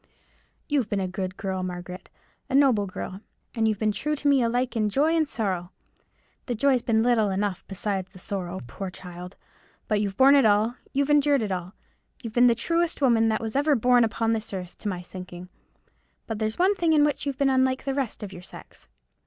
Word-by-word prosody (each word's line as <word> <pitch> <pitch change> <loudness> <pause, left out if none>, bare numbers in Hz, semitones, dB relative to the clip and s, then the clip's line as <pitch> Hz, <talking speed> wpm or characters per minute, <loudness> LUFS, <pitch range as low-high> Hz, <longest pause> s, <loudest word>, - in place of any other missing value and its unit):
You've 275 -7 0
been 205 - -1
a 190 - -1
good 185 0 -5
girl, 190 -1 -3
Margaret—a 180 +7 -8
noble 255 -8 +4
girl; 185 +1 -7 0.3
and 225 -2 +1
you've 215 -1 0
been 215 +1 +1
true 300 +8 -2
to 290 - -3
me 280 -2 +4
alike 245 +2 0
in 215 -2 +1
joy 300 +9 +2
and 315 -3 +1
sorrow—the 190 +4 -6
joy's 255 +2 +2
been 225 -1 +2
little 230 -4 +3
enough 195 -1 -2
beside 195 -1 -3
the 190 0 -16
sorrow, 185 -1 -5
poor 185 +11 -6
child—but 180 +3 -7
you've 200 -2 -3
borne 270 +1 +7
it 280 -1 +6
all; 215 +3 +3 0.2
you've 280 +2 0
endured 290 -3 +4
it 205 - -3
all. 180 +1 -4 0.5
You've 230 -2 -6
been 245 +1 +5
the 235 - +4
truest 335 +7 0
woman 230 -5 +3
that 220 - 0
was 225 +1 -5
ever 290 +1 +3
born 245 0 +4
upon 225 0 0
this 220 -1 -2
earth, 180 -2 -6
to - - -5
my 180 -2 -4
thinking; 180 0 -10 0.8
but 225 -2 -5
there's 215 0 -2
one 375 +3 +4
thing 340 -5 +1
in 300 -1 +5
which 295 -1 -2
you've 275 -2 -2
been 275 -1 +2
unlike 260 0 +1
the 275 - -1
rest 265 -5 -3
of 195 -2 -7
your 180 - -9
sex." - - -14
220 Hz, 200 wpm, -25 LUFS, 190-265 Hz, 0.8 s, borne